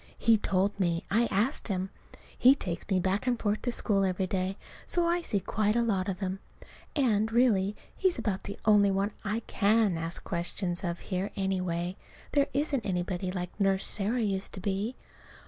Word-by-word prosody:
He 230 Hz, -, +5 dB
told 200 Hz, -1 st, 0 dB
me. 170 Hz, -3 st, 0 dB
I 230 Hz, +3 st, +3 dB
asked 225 Hz, +9 st, 0 dB
him. 190 Hz, -2 st, -2 dB, 0.4 s
He 260 Hz, +2 st, +6 dB
takes 180 Hz, -9 st, -5 dB
me 190 Hz, -2 st, +3 dB
back 190 Hz, +6 st, 0 dB
and 245 Hz, -2 st, +1 dB
forth 210 Hz, 0 st, 0 dB
to 245 Hz, -, -1 dB
school 200 Hz, -4 st, +2 dB
every 190 Hz, 0 st, 0 dB
day, 185 Hz, +1 st, -2 dB, 0.3 s
so 350 Hz, -1 st, +1 dB
I 345 Hz, +1 st, +2 dB
see 210 Hz, -11 st, 0 dB
quite 210 Hz, +3 st, 0 dB
a 235 Hz, -, +3 dB
lot 195 Hz, -5 st, 0 dB
of 190 Hz, +1 st, -4 dB
him. 190 Hz, 0 st, -2 dB, 0.6 s
And, 220 Hz, -6 st, +2 dB
really, 210 Hz, -5 st, +3 dB, 0.2 s
he's 375 Hz, -2 st, +1 dB
about 210 Hz, -5 st, -2 dB
the 200 Hz, -, -6 dB
only 205 Hz, -2 st, +6 dB
one 195 Hz, +2 st, 0 dB
I 215 Hz, +3 st, -1 dB
can 210 Hz, -5 st, +2 dB
ask 165 Hz, +1 st, -2 dB
questions 175 Hz, +1 st, -1 dB
of 170 Hz, -1 st, -2 dB
here, 185 Hz, +2 st, 0 dB
anyway. 185 Hz, -2 st, -1 dB, 0.3 s
There 285 Hz, -1 st, +3 dB
isn't 280 Hz, -3 st, 0 dB
anybody 180 Hz, -1 st, -2 dB
like 180 Hz, -1 st, -4 dB
Nurse 195 Hz, -1 st, +2 dB
Sarah 220 Hz, +4 st, 0 dB
used 195 Hz, -2 st, -1 dB
to -, -, -6 dB
be. 200 Hz, +5 st, -2 dB
200 Hz, 180 wpm, -29 LUFS, 185-225 Hz, 0.6 s, He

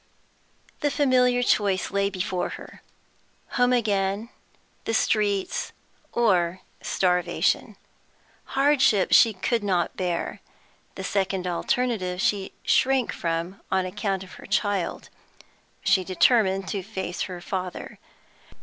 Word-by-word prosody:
The 290 Hz, -, +1 dB
familiar 255 Hz, -4 st, +3 dB
choice 200 Hz, -5 st, +1 dB
lay 200 Hz, 0 st, +1 dB
before 185 Hz, -1 st, -2 dB
her -, -, -13 dB, 0.7 s
home 245 Hz, 0 st, +2 dB
again, 205 Hz, -2 st, 0 dB, 0.6 s
the 225 Hz, -, 0 dB
streets, 205 Hz, -4 st, 0 dB, 0.4 s
or 185 Hz, -6 st, +2 dB, 0.2 s
starvation. 180 Hz, -1 st, 0 dB, 0.8 s
Hardship 270 Hz, -8 st, +4 dB
she 230 Hz, -, +7 dB
could 215 Hz, +3 st, -1 dB
not 185 Hz, -4 st, 0 dB
bear; 180 Hz, -2 st, -3 dB, 0.5 s
the 190 Hz, -, -6 dB
second 190 Hz, -1 st, -1 dB
alternative 185 Hz, +1 st, -1 dB
she 195 Hz, 0 st, 0 dB
shrank 265 Hz, -2 st, +2 dB
from 170 Hz, +3 st, -3 dB
on 190 Hz, -1 st, +2 dB
account 195 Hz, 0 st, -2 dB
of 190 Hz, -, -13 dB
her -, -, -11 dB
child; 205 Hz, -3 st, -1 dB, 0.7 s
she 190 Hz, -1 st, +3 dB
determined 190 Hz, 0 st, +3 dB
to 200 Hz, -, -2 dB
face 190 Hz, -2 st, -5 dB
her 180 Hz, -1 st, -6 dB
father. 185 Hz, 0 st, -5 dB
195 Hz, 110 wpm, -25 LUFS, 185-225 Hz, 0.8 s, she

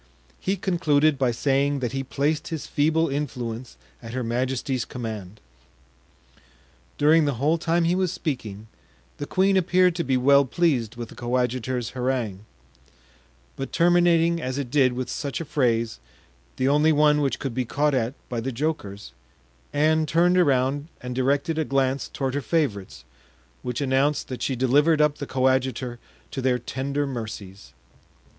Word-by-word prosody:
He 195 Hz, -, -1 dB
concluded 155 Hz, -6 st, +2 dB
by 130 Hz, -2 st, +2 dB
saying 140 Hz, +4 st, +1 dB
that 125 Hz, -4 st, -2 dB
he 135 Hz, -, -2 dB
placed 150 Hz, +4 st, -1 dB
his 160 Hz, -3 st, -4 dB
feeble 160 Hz, +3 st, +1 dB
influence 125 Hz, -4 st, -4 dB, 0.2 s
at 115 Hz, -1 st, -9 dB
her 130 Hz, 0 st, -2 dB
majesty's 125 Hz, +2 st, -1 dB
command. 110 Hz, -5 st, -7 dB, 1.6 s
During 155 Hz, +2 st, +4 dB
the 145 Hz, -3 st, 0 dB
whole 150 Hz, +7 st, +1 dB
time 170 Hz, +1 st, +1 dB
he 170 Hz, +1 st, +2 dB
was 185 Hz, -2 st, +1 dB
speaking, 110 Hz, -, -4 dB, 0.5 s
the 145 Hz, -, -5 dB
queen 195 Hz, +1 st, +2 dB
appeared 180 Hz, 0 st, +3 dB
to 170 Hz, -, 0 dB
be 130 Hz, -3 st, +1 dB
well 140 Hz, +2 st, +5 dB
pleased 130 Hz, -6 st, 0 dB
with 120 Hz, -1 st, -7 dB
the -, -, -13 dB
coadjutor's 125 Hz, 0 st, -1 dB
harangue; 125 Hz, -6 st, -2 dB, 1.1 s
but 135 Hz, -, -5 dB
terminating 170 Hz, -1 st, +3 dB
as 130 Hz, 0 st, -3 dB
it 135 Hz, -4 st, -4 dB
did 130 Hz, -3 st, +3 dB
with 125 Hz, 0 st, -3 dB
such 140 Hz, +2 st, -4 dB
a 165 Hz, -, -4 dB
phrase, 115 Hz, -, 0 dB, 0.6 s
the 130 Hz, -, +1 dB
only 150 Hz, +3 st, +4 dB
one 150 Hz, 0 st, +4 dB
which 140 Hz, -2 st, 0 dB
could 135 Hz, -4 st, -4 dB
be 130 Hz, +2 st, -1 dB
caught 145 Hz, +4 st, 0 dB
at 125 Hz, 0 st, 0 dB
by 120 Hz, -, -3 dB
the 130 Hz, +4 st, -3 dB
jokers, 115 Hz, -7 st, -4 dB, 0.6 s
Anne 155 Hz, +1 st, +2 dB
turned 175 Hz, +3 st, +3 dB
around 140 Hz, -3 st, +2 dB
and 125 Hz, 0 st, -5 dB
directed 140 Hz, +5 st, 0 dB
a -, -, +2 dB
glance 135 Hz, -1 st, 0 dB
toward 135 Hz, -2 st, -3 dB
her 145 Hz, -, -1 dB
favorites, 110 Hz, -, -2 dB, 0.6 s
which 125 Hz, +2 st, -3 dB
announced 140 Hz, +2 st, +1 dB
that 130 Hz, -, -6 dB
she 135 Hz, -, -1 dB
delivered 145 Hz, +6 st, +3 dB
up 150 Hz, -1 st, +2 dB
the 140 Hz, -, -5 dB
coadjutor 130 Hz, -2 st, 0 dB, 0.3 s
to 135 Hz, -, -4 dB
their 130 Hz, -1 st, +2 dB
tender 135 Hz, +4 st, -3 dB
mercies. 105 Hz, -, -7 dB
135 Hz, 155 wpm, -24 LUFS, 125-150 Hz, 1.6 s, well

